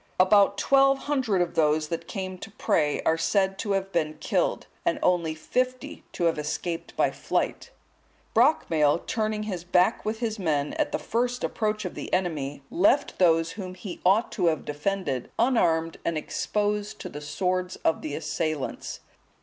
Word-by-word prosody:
About 195 Hz, +2 st, +5 dB
twelve 275 Hz, 0 st, +4 dB
hundred 255 Hz, -11 st, +1 dB
of 175 Hz, -, -6 dB
those 155 Hz, -1 st, +2 dB
that 165 Hz, 0 st, -4 dB
came 185 Hz, -3 st, -5 dB
to 220 Hz, -, -8 dB
pray 150 Hz, -7 st, 0 dB
are 160 Hz, 0 st, +2 dB
said 195 Hz, +3 st, +1 dB
to 205 Hz, -3 st, -1 dB
have 195 Hz, 0 st, -1 dB
been 155 Hz, -3 st, 0 dB
killed, -, -, 0 dB, 0.2 s
and 340 Hz, -, +1 dB
only 170 Hz, -3 st, +2 dB
fifty 255 Hz, +10 st, -2 dB
to -, -, -3 dB
have 165 Hz, -2 st, +2 dB
escaped 165 Hz, +3 st, -4 dB
by -, -, +3 dB
flight. -, -, -2 dB, 0.6 s
Brocmail, 170 Hz, -, +3 dB
turning 215 Hz, -1 st, -1 dB
his 185 Hz, -5 st, -4 dB
back 180 Hz, +4 st, +2 dB
with 215 Hz, +1 st, -2 dB
his 220 Hz, -2 st, -3 dB
men, 150 Hz, -5 st, 0 dB
at -, -, +1 dB
the -, -, 0 dB
first 245 Hz, +2 st, -1 dB
approach 215 Hz, -2 st, -1 dB
of 180 Hz, -, -4 dB
the -, -, -7 dB
enemy, 150 Hz, -7 st, -1 dB
left 200 Hz, +10 st, +2 dB
those 165 Hz, -2 st, +4 dB
whom 185 Hz, -3 st, -7 dB
he 185 Hz, -1 st, -8 dB
ought 200 Hz, +6 st, +3 dB
to 180 Hz, -5 st, 0 dB
have 160 Hz, -2 st, 0 dB
defended 150 Hz, -3 st, -2 dB
unarmed 170 Hz, -10 st, +2 dB
and 170 Hz, -1 st, -1 dB
exposed 210 Hz, +5 st, -2 dB
to -, -, -7 dB
the 150 Hz, -, -8 dB
swords 180 Hz, +4 st, -1 dB
of 160 Hz, -, +2 dB
the 145 Hz, -2 st, -4 dB
assailants. 155 Hz, -2 st, -3 dB
185 Hz, 165 wpm, -26 LUFS, 160-210 Hz, 0.6 s, About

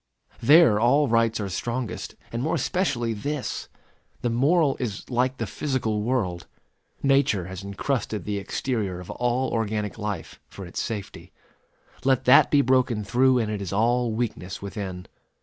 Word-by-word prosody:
There 140 Hz, -4 st, +6 dB
all 140 Hz, +6 st, +4 dB
rights 115 Hz, -1 st, +2 dB
are 100 Hz, -, -2 dB
strongest, 120 Hz, +5 st, -4 dB, 0.2 s
and 115 Hz, -, -3 dB
more 155 Hz, +5 st, 0 dB
especially 120 Hz, -11 st, 0 dB
this. 140 Hz, +6 st, -4 dB, 0.5 s
The 120 Hz, -, +1 dB
moral 140 Hz, +4 st, +3 dB
is 110 Hz, -5 st, -4 dB
like 125 Hz, +2 st, +1 dB
the -, -, -2 dB
physical 125 Hz, -7 st, -2 dB
world. 105 Hz, -8 st, -1 dB, 0.6 s
Nature 135 Hz, -9 st, +3 dB
has 95 Hz, +1 st, -7 dB
incrusted 105 Hz, +1 st, -2 dB
the 105 Hz, -1 st, -2 dB
exterior 100 Hz, -3 st, -2 dB
of 90 Hz, -, -8 dB
all 125 Hz, +2 st, 0 dB
organic 110 Hz, -1 st, -2 dB
life, 105 Hz, -1 st, -5 dB
for 100 Hz, -, -9 dB
its 85 Hz, -, -6 dB
safety. 105 Hz, -4 st, -6 dB, 0.7 s
Let 130 Hz, -1 st, +2 dB
that 125 Hz, -, +7 dB
be 145 Hz, -, +5 dB
broken 125 Hz, -4 st, +2 dB
through, 125 Hz, +5 st, +3 dB
and 110 Hz, -3 st, 0 dB
it 105 Hz, -1 st, -3 dB
is 95 Hz, -, -4 dB
all 120 Hz, +3 st, +2 dB
weakness 110 Hz, -5 st, -3 dB
within. 95 Hz, -2 st, -6 dB
115 Hz, 150 wpm, -25 LUFS, 105-130 Hz, 0.7 s, that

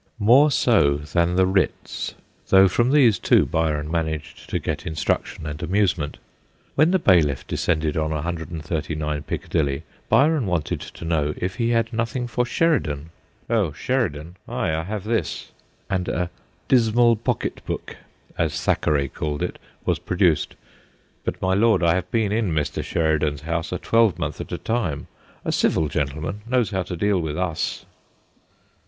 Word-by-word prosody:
More 125 Hz, +8 st, +6 dB
so 110 Hz, -, +3 dB
than 85 Hz, +4 st, 0 dB
the 95 Hz, 0 st, +4 dB
writs, 95 Hz, 0 st, -1 dB, 0.3 s
though 95 Hz, 0 st, +7 dB
from 120 Hz, +7 st, +2 dB
these 130 Hz, -9 st, +5 dB
too -, -, +4 dB
Byron 75 Hz, -1 st, -1 dB
managed 80 Hz, -3 st, -3 dB
to -, -, 0 dB
get -, -, -4 dB
instruction 80 Hz, 0 st, -2 dB
and 75 Hz, 0 st, -5 dB
amusement. 90 Hz, -6 st, 0 dB, 0.6 s
When 155 Hz, +3 st, +4 dB
the 190 Hz, -, +4 dB
bailiff 85 Hz, -, +3 dB
descended 80 Hz, -2 st, 0 dB
on 80 Hz, -1 st, 0 dB
139 80 Hz, -1 st, -3 dB
Piccadilly 70 Hz, 0 st, -2 dB, 0.3 s
Byron 145 Hz, -4 st, +4 dB
wanted 90 Hz, -4 st, -1 dB
to -, -, -9 dB
know 75 Hz, -3 st, 0 dB
if 90 Hz, +1 st, -3 dB
he 115 Hz, -1 st, +1 dB
had 115 Hz, 0 st, +1 dB
nothing 115 Hz, +2 st, -1 dB
for 120 Hz, 0 st, -1 dB
Sheridan. 80 Hz, -, 0 dB, 0.2 s
' -, -, -38 dB
Oh, 100 Hz, -10 st, +2 dB
Sheridan? 85 Hz, -, -2 dB
Ay, 80 Hz, -, -1 dB
I 80 Hz, -, 0 dB
have 105 Hz, 0 st, -4 dB
this,' 115 Hz, +1 st, -2 dB, 0.4 s
and 95 Hz, -2 st, -1 dB
a 90 Hz, 0 st, -1 dB, 0.2 s
' -, -, -38 dB
dismal 120 Hz, -1 st, +4 dB
pocket 110 Hz, -, -2 dB
book/ -, -, -5 dB, 0.4 s
as -, -, 0 dB
Thackeray 70 Hz, -2 st, +1 dB
called 75 Hz, +1 st, -3 dB
it, -, -, -4 dB, 0.3 s
was -, -, +1 dB
produced. 90 Hz, -4 st, +1 dB, 0.3 s
' -, -, -37 dB
But, -, -, -2 dB
my 95 Hz, 0 st, +2 dB
Lord, 110 Hz, -1 st, +3 dB
I 85 Hz, -1 st, +4 dB
have 90 Hz, 0 st, -2 dB
been 110 Hz, -2 st, +1 dB
in 105 Hz, -5 st, 0 dB
Mr. 75 Hz, -1 st, -1 dB
Sheri 80 Hz, -2 st, +1 dB
dan's 75 Hz, -2 st, -1 dB
house 80 Hz, +2 st, -3 dB
a 90 Hz, -, -1 dB
twelvemonth 115 Hz, -2 st, +1 dB
at -, -, -8 dB
a -, -, -2 dB
time; 100 Hz, -12 st, -2 dB, 0.4 s
a -, -, 0 dB
civil 80 Hz, -2 st, +2 dB
gentleman 75 Hz, +7 st, -3 dB
knows 120 Hz, -4 st, +1 dB
how 95 Hz, -1 st, 0 dB
to 90 Hz, 0 st, -5 dB
deal 100 Hz, -1 st, +2 dB
with 75 Hz, -2 st, -3 dB
us.' 90 Hz, -4 st, -2 dB
90 Hz, 160 wpm, -23 LUFS, 75-110 Hz, 0.6 s, though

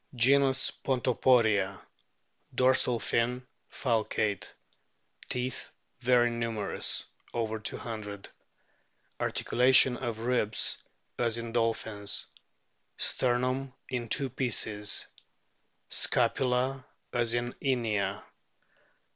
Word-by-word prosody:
Genus 135 Hz, +2 st, +4 dB
PONTOPORIA. 115 Hz, -6 st, +2 dB, 0.8 s
Dorsal 125 Hz, -1 st, +3 dB
fin 125 Hz, +3 st, -1 dB, 0.3 s
falcate. 110 Hz, -4 st, -1 dB, 0.8 s
Teeth 125 Hz, 0 st, -3 dB, 0.3 s
very 120 Hz, -1 st, +3 dB
numerous, 115 Hz, -3 st, -1 dB, 0.3 s
over 110 Hz, -1 st, -2 dB
200. 105 Hz, -2 st, -5 dB, 0.9 s
Articulation 125 Hz, 0 st, +4 dB
of 115 Hz, -3 st, -4 dB
ribs 115 Hz, -3 st, +1 dB, 0.4 s
as 115 Hz, -1 st, +1 dB
in 115 Hz, 0 st, -5 dB
dolphins. 110 Hz, -3 st, -1 dB, 0.7 s
Sternum 130 Hz, +2 st, 0 dB, 0.2 s
in 120 Hz, -3 st, -3 dB
two 135 Hz, 0 st, +2 dB
pieces. 110 Hz, -5 st, +1 dB, 0.8 s
Scapula 130 Hz, +1 st, +1 dB, 0.3 s
as 120 Hz, -1 st, +1 dB
in 120 Hz, 0 st, -2 dB
Inia. 115 Hz, -7 st, -1 dB
120 Hz, 75 wpm, -29 LUFS, 110-125 Hz, 0.9 s, Genus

